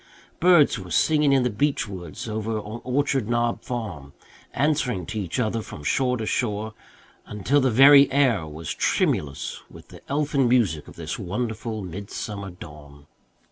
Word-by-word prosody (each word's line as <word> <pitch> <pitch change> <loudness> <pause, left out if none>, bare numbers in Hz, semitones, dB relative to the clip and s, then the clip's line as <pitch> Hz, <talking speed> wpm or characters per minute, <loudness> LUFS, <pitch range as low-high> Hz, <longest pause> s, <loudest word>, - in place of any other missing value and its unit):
Birds 170 - +5
were 90 -2 -9
singing 150 - +3
in 135 -2 +4
the 125 - +1
beech 140 +2 0
woods 95 +4 -8
over 110 0 -3
on 110 +2 -7
Orchard 135 -3 0
Knob 120 0 0
Farm, 90 - -6 0.4
answering 140 - 0
to 110 -2 -4
each 95 +5 -3
other 115 -1 0
from 75 - -10
shore 125 - +1
to 110 - -4
shore, 110 -2 -2 0.5
until 105 +8 +1
the 130 - +2
very 140 +4 +7
air 125 - +2
was 75 +1 -6
tremulous 70 -2 -1
with - - -15
the - - -13
elfin 140 -3 +1
music 100 -12 +1
of - - -13
this - - -5
wonderful 110 +1 -4
midsummer 100 +2 -6
dawn. 75 -5 -13
110 Hz, 155 wpm, -24 LUFS, 95-130 Hz, 0.5 s, very